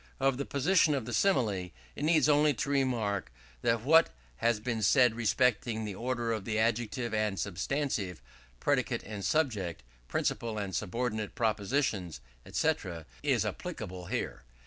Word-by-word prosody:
Of 135 -1 +2
the 140 - -3
position 155 +2 +3
of 130 -5 -2
the - - -5
Simile, 110 - +2 0.3
it - - -5
needs 155 -2 +4
only 150 -1 +4
to 140 - -2
remark, 120 - 0 0.3
that 115 -1 +2
what 160 +5 +6 0.3
has 115 - +2
been 115 0 -2
said 125 +3 +5
respecting 115 0 +1
the 105 - -4
order 120 +2 -2
of 110 -3 -3
the 110 +1 -2
adjective 115 +1 0
and 105 -3 0
substantive, 100 - -2 0.4
predicate - - 0
and 105 -2 -6
subject, 100 - 0 0.2
principal 115 -2 -1
and 100 -3 -3
subordinate 110 +1 -2
propositions, 105 - 0 0.3
&c., - - +3 0.5
is - - +2
applicable 90 -1 -5
here. - - -3
115 Hz, 145 wpm, -31 LUFS, 105-135 Hz, 0.5 s, what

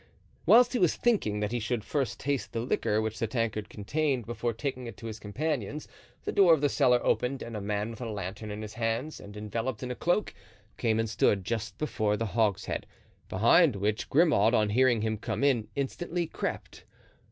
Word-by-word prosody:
Whilst 245 +2 +7
he 250 - +1
was 180 -4 +3
thinking 110 - +1
that 105 0 -1
he 120 - -1
should 115 0 -2
first 140 -1 -2
taste 140 -1 -2
the 115 - -1
liquor 110 -3 0
which 110 0 -3
the 115 - 0
tankard 110 -2 -2
contained 135 +3 -1
before 120 0 -2
taking 125 +1 -4
it 115 - -9
to 115 - -10
his 110 -1 -6
companions, 145 +4 -3 0.4
the - - -2
door 180 -5 +6
of 145 - -6
the 145 - +3
cellar 125 -2 +4
opened 130 +2 0
and 115 - -7
a 105 - -4
man 105 +2 -2
with 115 - -10
a 120 - -3
lantern 105 +1 -5
in 105 +1 -5
his 105 0 -7
hands 115 +6 -2
and 100 +1 -11
enveloped 115 +3 -3
in 125 - -3
a - - -3
cloak, 175 +8 0 0.4
came 110 -2 +1
and 115 - +1
stood 100 -2 +1
just 115 +1 -3
before 110 -8 0
the 115 - -1
hogshead, 110 -2 -1 0.4
behind 120 - +5
which 105 +2 -1
Grimaud, 135 - +4
on 105 -2 +2
hearing 120 -1 +3
him 110 0 -1
come 115 - -3
in, 125 -6 +2
instantly 170 +5 -2
crept. - - -5
115 Hz, 200 wpm, -29 LUFS, 105-140 Hz, 0.4 s, Whilst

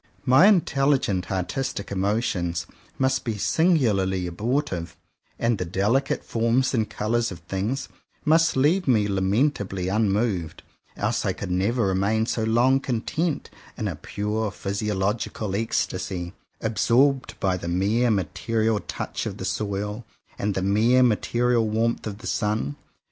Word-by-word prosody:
My 135 +9 +7
intelligent 135 - +2
artistic 100 +4 -3
emotions 95 -4 -1 0.3
must 130 0 +1
be 115 -3 -3
singularly 105 - +2
abortive; 100 - -2 0.4
and 115 -3 +1
the - - 0
delicate 105 +10 0
forms 115 +4 +1
and 110 -4 0
colours 115 +2 -1
of 90 - -6
things 95 - -3 0.4
must 165 -1 +4
leave 160 +7 +3
me 110 -5 +3
lament 100 +8 +1
ably 95 -2 -3
unmoved; 100 -4 0 0.3
else - - 0
I - - 0
could 95 - -6
never 105 +6 +1
remain 100 +4 +1
so 115 -1 -1
long 120 +4 +3
content, 140 +6 -2 0.3
in - - -2
a - - -3
pure 105 +1 -2
physiological 100 0 -2
ecstasy, 95 -4 -2 0.3
absorbed 125 +5 +2
by 95 -2 +1
the 85 -2 -6
mere 100 +8 +2
material 110 +3 0
touch - - -4
of - - -5
the - - -5
soil, 105 +2 -3 0.4
and 100 -1 -1
the 95 - -1
mere 110 +6 +4
material 120 0 +2
warmth 115 +1 0
of 100 -2 -5
the 110 - -12
sun. 105 - -1
110 Hz, 135 wpm, -24 LUFS, 95-125 Hz, 0.4 s, My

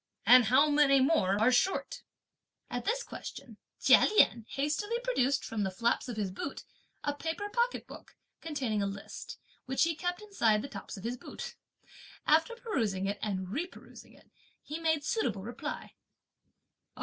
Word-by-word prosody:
and 250 -1 +8
how 260 +7 +5
many 290 -2 +5
more 260 - +3
are 225 +4 +4
short?" 375 +10 +1 0.7
At - - -3
this - - 0
question, - - -9 0.2
Chia - - +6
Lien 230 - +4
hastily 310 +12 -1
produced, 285 - +1
from 225 -2 -3
the 195 - 0
flaps 230 +6 0
of 235 - -5
his 200 -3 -1
boot, 195 +9 -6 0.4
a 290 - 0
paper 325 +7 -4
pocket 480 +3 0
book, - - -13 0.3
containing 260 -10 -2
a 200 - 0
list, 200 0 -7 0.3
which 265 0 +2
he 330 0 +2
kept 355 +3 -3
inside 235 - +1
the - - -4
tops - - -8
of 195 - -10
his 240 +2 -3
boot. - - -8 0.7
After 325 +10 +3
perusing 225 - -1
it 200 +1 -2
and 190 -3 -2
reperusing 315 - -7
it, - - -23 0.3
he 305 +3 -5
made 320 -2 +1
suitable 435 - -1
reply. 235 +4 -6
275 Hz, 160 wpm, -31 LUFS, 215-330 Hz, 0.7 s, and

